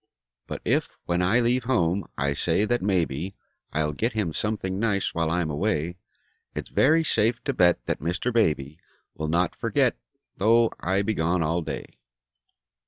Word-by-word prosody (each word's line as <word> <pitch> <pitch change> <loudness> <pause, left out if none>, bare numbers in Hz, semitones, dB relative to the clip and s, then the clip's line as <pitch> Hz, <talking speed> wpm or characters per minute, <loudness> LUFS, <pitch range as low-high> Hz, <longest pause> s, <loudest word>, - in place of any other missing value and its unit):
But - - -6
if, - - +1 0.2
when 85 +1 0
I 100 +7 +3
leave 120 +1 +1
home, 100 -7 +1
I 70 +1 +1
say 100 - +1
that 120 +2 0
maybe 90 -2 -1 0.4
I'll 75 0 0
get 115 - -1
him 105 -7 -1
something 100 -2 -2
nice 100 -3 0
while 85 -1 0
I'm 85 -2 0
away, 85 +1 -1 0.6
It's - - -5
very 160 +4 +4
safe 115 -6 +1
to 140 - -1
bet 90 -6 +3
that - - -1
Mr. 90 +10 -2
Baby 75 -8 +1 0.3
Will 80 - -4
not 85 +3 +1
forget, - - +1 0.4
though 115 +3 +4
I 95 +3 +1
be 110 +2 0
gone 85 -1 +1
all 80 +3 0
day. - - -7
95 Hz, 165 wpm, -26 LUFS, 80-110 Hz, 0.6 s, very